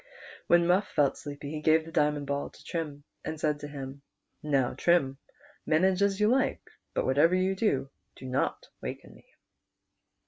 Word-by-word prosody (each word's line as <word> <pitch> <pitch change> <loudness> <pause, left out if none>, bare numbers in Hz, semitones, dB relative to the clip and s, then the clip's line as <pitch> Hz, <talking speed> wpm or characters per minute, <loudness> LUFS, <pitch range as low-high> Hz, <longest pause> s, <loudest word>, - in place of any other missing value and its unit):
When 170 0 +5
Muff 185 +4 +3
felt 140 -2 +2
sleepy 145 0 -7
he 155 -1 -4
gave 160 +1 +4
the 165 - -10
diamond 150 -2 +1
ball 140 0 -2
to - - -18
Trim, 150 -4 -4 0.2
and 160 - -5
said 150 -1 0
to 145 - -6
him, 140 -1 -7 0.4
"Now, 140 -4 +1
Trim, 140 -6 +2 0.4
manage 185 +4 +2
as 200 0 +2
you 210 - +4
like, 265 +4 +1 0.3
but - - +1
whatever 145 +7 +4
you 185 +1 +2
do, 140 -10 0 0.2
do - - -11
not 130 +1 -1 0.2
waken - - -7
me." - - -19
150 Hz, 170 wpm, -29 LUFS, 140-175 Hz, 0.4 s, When